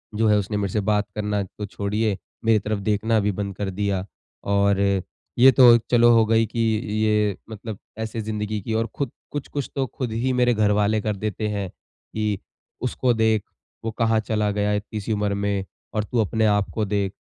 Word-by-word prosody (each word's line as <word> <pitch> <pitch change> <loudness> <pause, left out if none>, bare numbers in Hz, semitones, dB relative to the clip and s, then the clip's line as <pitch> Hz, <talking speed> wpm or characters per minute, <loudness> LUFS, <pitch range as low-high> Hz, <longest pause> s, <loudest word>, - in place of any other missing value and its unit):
जो 110 +1 +2
है 105 0 +5
उसने 105 +1 -1
मेरे 100 -2 -2
से 105 - +1
बात 105 +1 +1
करना 105 -1 -1
तो 105 +2 -7
छोड़िए, 105 +1 -1 0.3
मेरी 110 -1 +5
तरफ 105 0 -2
देखना 110 +2 +1
भी 105 0 +1
बंद 100 -1 -4
कर 100 -2 -2
दिया। 100 -1 -1 0.4
और 100 0 +2 0.6
ये 130 +2 +9
तो 120 -1 +8
चलो 120 0 +6
हो 115 -1 +5
गई 115 0 +3
कि 115 - -6 0.3
ये 105 -2 +2
मतलब 110 -1 -7 0.2
ऐसे 110 0 -3
ज़िन्दगी 105 0 -3
की 110 - -4
और 115 +1 +1
खुद 140 -4 -2 0.2
कुछ-कुछ 145 -1 -4
तो 135 -1 +1
खुद 120 0 -4
ही 125 +3 0
मेरे 125 -1 +3
घर 105 -1 +2
वाले 105 +1 +2
कर 105 -1 -1
देते 105 +1 -3
हैं 100 -3 -2
कि 105 +1 -5 0.4
उसको 125 0 +1
देख 110 -2 +2 0.4
वो 115 - -1
कहाँ 115 -1 +3
चला 105 -1 0
गया 105 0 0
इतनी 105 +1 -3
सी 110 - -2
उम्र 105 -1 0
में 100 -1 -1 0.3
और 105 -1 0
तू 115 +2 -2
अपने 110 +2 +1
आप 105 -1 +2
को 110 -2 0
देख। 100 -1 -1
105 Hz, 200 wpm, -23 LUFS, 100-110 Hz, 0.6 s, ये